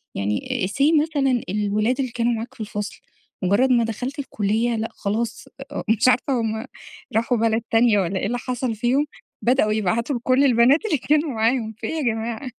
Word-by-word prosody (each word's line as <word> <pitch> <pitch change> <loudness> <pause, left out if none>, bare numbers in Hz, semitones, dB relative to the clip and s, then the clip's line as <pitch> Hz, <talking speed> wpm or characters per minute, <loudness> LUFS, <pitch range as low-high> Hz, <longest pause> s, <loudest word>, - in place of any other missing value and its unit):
يعني 105 - -1
say 295 +7 +3
مثلًا 275 -6 +1
الولاد 210 +5 0
اللي 260 -3 -1
كانوا 235 0 0
معاك 230 +1 -5
في - - -11
الفصل، 210 0 -5 0.4
مجرد 200 +8 +3
ما 240 -2 +4
دخلت 245 +5 -4
الكلية، 225 -2 0
لأ 225 0 -2
خلاص 220 +4 -3 0.4
مش 220 +2 +3
عارفة 255 +2 +3
هم 220 +1 -2 0.5
راحوا 230 +2 +2
بلد 225 0 +1
تانية، 225 -2 +4
والَّا 190 0 -1
ايه - - -2
اللي 245 +3 -1
حصل 245 -1 -3
فيهم، 250 +6 +1 0.4
بدأوا 240 -3 +2
يبعتوا 220 +6 0
لكل 255 +3 +2
البنات 255 - +4
اللي 350 -9 +1
كانوا 300 +4 +1
معاهم، 225 -1 0
في - - -5
إيه - - -3
يا - - -1
جماعة؟ 230 +1 -2
235 Hz, 175 wpm, -22 LUFS, 220-255 Hz, 0.5 s, ما